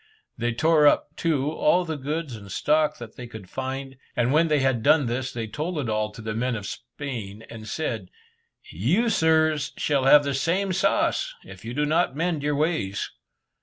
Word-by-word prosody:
They 120 0 -1
tore 155 +4 +4
up, 145 +1 +2
too, 150 -3 0
all 175 +3 +2
the 160 -1 -3
goods 145 -1 -3
and 100 -3 -11
stock 155 +7 +2
that 120 -2 -10
they 125 - -7
could 110 -5 -10
find, 135 +3 -5 0.2
and 125 +3 +2
when 165 +2 +4
they 155 -1 +3
had 130 -3 +1
done 145 +5 +4
this, 125 +2 -2
they 115 -2 -4
told 155 +10 -4
it 135 -6 -2
all 110 0 0
to 110 - -10
the 110 0 -3
men 125 +2 -1
of 105 -2 -5
Spain, 115 -3 -7
and 110 -2 -9
said, 115 - -3 0.6
"You, 175 - +1
sirs, 160 -4 +2
shall 140 -3 +1
have 145 +2 +8
the 140 -1 -1
same 185 +8 0
sauce, - - +1
if - - -12
you 115 +2 -6
do 150 +1 +1
not 160 -1 +1
mend 165 -1 -1
your 145 0 0
ways." 145 - -1
140 Hz, 195 wpm, -25 LUFS, 115-155 Hz, 0.6 s, have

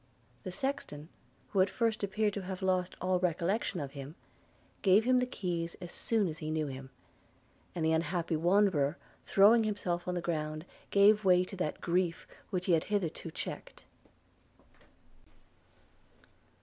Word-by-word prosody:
The 185 - -6
sexton, 180 - -4 0.4
who 195 - +2
at 190 - +3
first 225 -2 -1
appeared 205 +1 0
to 200 - -3
have 190 0 -6
lost 185 -1 0
all 185 0 +1
recollection 180 +2 0
of 140 -2 -5
him, 140 +2 -8 0.7
gave 195 +2 +5
him 255 +1 +4
the 250 - 0
keys 175 -7 -3
as 175 -1 -8
soon 220 -4 0
as 160 -1 -5
he 155 - -4
knew 155 0 0
him 135 -1 -7 0.4
– - - -35
and 165 -2 -1
the 160 - +3
unhappy 165 +1 0
wanderer, 170 -3 +2 0.3
throwing 220 +4 +6
himself 180 -5 -2
on 180 - -1
the - - 0
ground, 155 -2 -3 0.2
gave 205 +1 +5
way 180 -1 +5
to 185 - -8
that 165 -4 -3
grief 175 0 0 0.2
which 180 -3 -2
he - - +1
had 160 - +2
hitherto 180 -5 -2
checked. - - -7
180 Hz, 155 wpm, -32 LUFS, 165-200 Hz, 0.7 s, throwing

